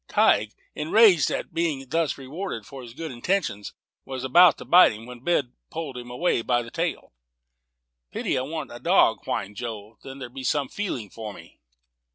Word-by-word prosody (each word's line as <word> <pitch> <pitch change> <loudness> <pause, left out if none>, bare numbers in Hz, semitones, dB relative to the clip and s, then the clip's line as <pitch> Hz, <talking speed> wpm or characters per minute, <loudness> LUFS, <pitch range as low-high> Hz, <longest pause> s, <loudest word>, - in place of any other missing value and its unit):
Tige, - - +3 0.2
enraged 180 0 +5
at - - -4
being 155 -5 -1
thus 160 +2 0
rewarded 135 - -6
for 135 +3 -10
his 120 -1 -11
good 160 0 -5
intentions, 120 - -2 0.3
was 130 -1 -5
going 175 +6 +7
to - - -12
bite 180 -9 +7
him, 110 +2 -10
when 125 0 -10
Ben 140 -7 0 0.2
pulled 160 -5 -5
him 125 0 -8
away 125 +1 0
by 120 +1 +1
the 115 - -11
tail. 165 - -3 1.0
"Pity - - -1
I 130 - +1
wan't 155 +2 -5
a 120 - -8
dog," - - +3
whined 100 +1 -3
Joe; 110 -2 -7
"then 135 0 -9
there'd 125 -2 -8
be 135 - -7
some 140 +1 0
feeling 130 - -4
for 110 -2 -7
me." - - -15
135 Hz, 185 wpm, -25 LUFS, 120-165 Hz, 1.0 s, going